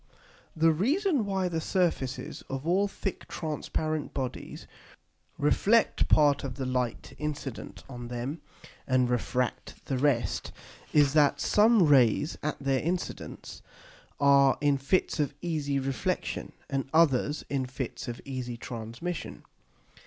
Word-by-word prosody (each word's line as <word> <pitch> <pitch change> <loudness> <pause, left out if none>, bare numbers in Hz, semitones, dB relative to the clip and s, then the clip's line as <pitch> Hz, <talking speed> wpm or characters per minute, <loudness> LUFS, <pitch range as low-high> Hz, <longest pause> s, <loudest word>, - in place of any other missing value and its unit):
_The 160 0 +4
reason 285 - +1
why 190 -2 0
the 165 -2 -2
Surfaces 170 -8 -1
of 135 +2 -4
all 190 +4 +3
thick 195 -1 -5
transparent 155 -1 -3
Bodies 130 -2 -5 0.7
reflect 210 +10 +3
part 145 -2 +4
of 130 -2 -4
the 135 -1 -3
Light 125 -2 -2
incident 145 -4 -5
on 120 -2 -7
them, 125 +6 -4 0.5
and 130 -1 +2
refract 125 +1 -2
the 130 -2 -1
rest, 135 -4 +1 0.4
is, 145 -2 +4
that 150 -2 +4
some 215 -1 +5
Rays 140 +1 +4
at 150 0 -2
their 135 -1 0
Incidence 175 +5 -4 0.6
are 140 -1 +5
in 145 -2 +2
Fits 160 +5 +1
of 145 -1 0
easy 150 -5 -1
Reflexion, 135 -1 -2
and 135 -1 -2
others 150 -2 +3
in 135 -2 -1
Fits 125 -1 -5
of 120 -1 -5
easy 130 -3 -5
Transmission. 120 +8 -6
145 Hz, 125 wpm, -28 LUFS, 130-165 Hz, 0.7 s, some